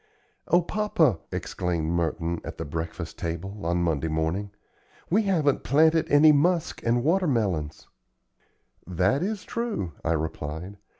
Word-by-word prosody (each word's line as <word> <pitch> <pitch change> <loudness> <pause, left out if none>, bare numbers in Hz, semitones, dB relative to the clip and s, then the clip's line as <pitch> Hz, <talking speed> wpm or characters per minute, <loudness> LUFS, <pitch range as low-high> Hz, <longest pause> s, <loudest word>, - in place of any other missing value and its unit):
"O 175 0 +4
papa!" 170 - +1
exclaimed 85 -3 -2
Merton, 85 0 -1
at - - -7
the - - -4
breakfast 80 +2 -5
table, 95 +5 -5
on 85 0 +1
Monday 80 -2 0
morning; 80 +6 -1 0.6
"we 210 +5 +4
haven't 165 -9 +1
planted 160 +4 +3
any 150 +2 +7
musk 165 +3 +1
and 120 +1 +1
water 180 +5 +2
melons!" 95 - -1 1.0
"That 95 - +1
is 205 +2 -2
true," 230 - -3
I 85 - +1
replied. 80 +4 -4
100 Hz, 130 wpm, -26 LUFS, -, 1.0 s, any